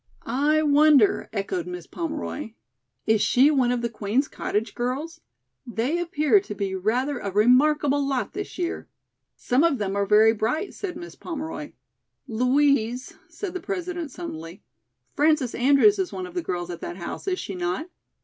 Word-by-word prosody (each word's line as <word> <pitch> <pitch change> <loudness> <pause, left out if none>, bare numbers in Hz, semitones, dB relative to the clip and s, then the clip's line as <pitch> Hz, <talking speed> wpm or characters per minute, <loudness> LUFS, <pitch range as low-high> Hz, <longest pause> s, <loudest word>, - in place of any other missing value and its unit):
"I 300 +3 +2
wonder," 290 -6 +4
echoed 275 - -3
Miss 360 0 -6
Pomeroy. 300 -7 -5 0.5
"Is 220 -1 +3
she 255 +7 +5
one 260 -4 +2
of 245 -1 -1
the - - +2
Queen's 230 +4 -1
Cottage 215 +2 -3
girls? 265 +7 -3 0.4
They 250 +6 -1
appear 335 +2 +3
to 380 - -8
be 195 -1 -2
rather 245 +9 0
a 200 - -4
remarkable 280 +7 +3
lot 270 -2 -2
this 405 0 -6
year." 350 -1 -3 0.5
"Some 255 +5 +1
of 335 -5 +3
them 200 -3 -2
are 200 0 0
very 215 +2 +6
bright," 240 - -2
said 360 -4 -5
Miss 345 0 -9
Pomeroy. 315 - -6 0.5
"Louise," 250 0 +1 0.2
said 395 -4 -6
the 370 - -3
President 355 -3 -4
suddenly, 175 - -8 0.5
"Frances 300 -4 +2
Andrews 280 - +4
is 375 - -1
one 370 - -5
of 360 - -10
the 355 - -1
girls 180 - -4
at 170 - -8
that 175 - -6
house, 175 - -6
is 370 -1 0
she 200 - -5
not?" 180 - -2
275 Hz, 165 wpm, -25 LUFS, 220-325 Hz, 0.5 s, very